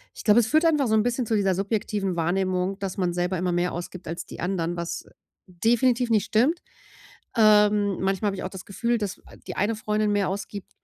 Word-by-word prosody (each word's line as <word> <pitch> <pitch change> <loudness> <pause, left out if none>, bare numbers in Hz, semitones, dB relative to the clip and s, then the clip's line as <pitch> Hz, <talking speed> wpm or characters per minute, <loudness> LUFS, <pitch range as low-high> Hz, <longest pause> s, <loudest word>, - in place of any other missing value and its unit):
ich - - -9
glaube, 215 +2 +5
es 220 - -1
führt 310 +5 +3
einfach 300 -6 +3
so 220 - +2
'n 215 - +3
bisschen 245 +1 -1
zu 220 - +1
dieser 195 -2 +2
subjektiven 200 -2 -1
Wahrnehmung, 185 +3 0
dass 195 -1 -4
man 180 -2 0
selber 180 +1 -1
immer 180 0 -1
mehr 175 +1 0
ausgibt 175 0 -7
als 170 +1 -5
die - - -11
anderen, 175 -2 -1
was, 170 0 -4
äh, - - -21 0.4
definitiv 235 +6 +1
nicht 215 -2 +3
stimmt. 265 +12 +2 0.8
Ähm, 210 -2 +4
manchmal 195 +2 0
habe 195 - -2
ich - - -5
auch - - -2
das 190 -2 -9
Gefühl, 235 +4 -1
dass 205 -3 -4 0.3
die - - -5
eine 210 +3 +1
Freundin 210 -1 0
mehr 200 -2 +1
ausgibt 200 0 -6
200 Hz, 215 wpm, -25 LUFS, 185-220 Hz, 0.8 s, glaube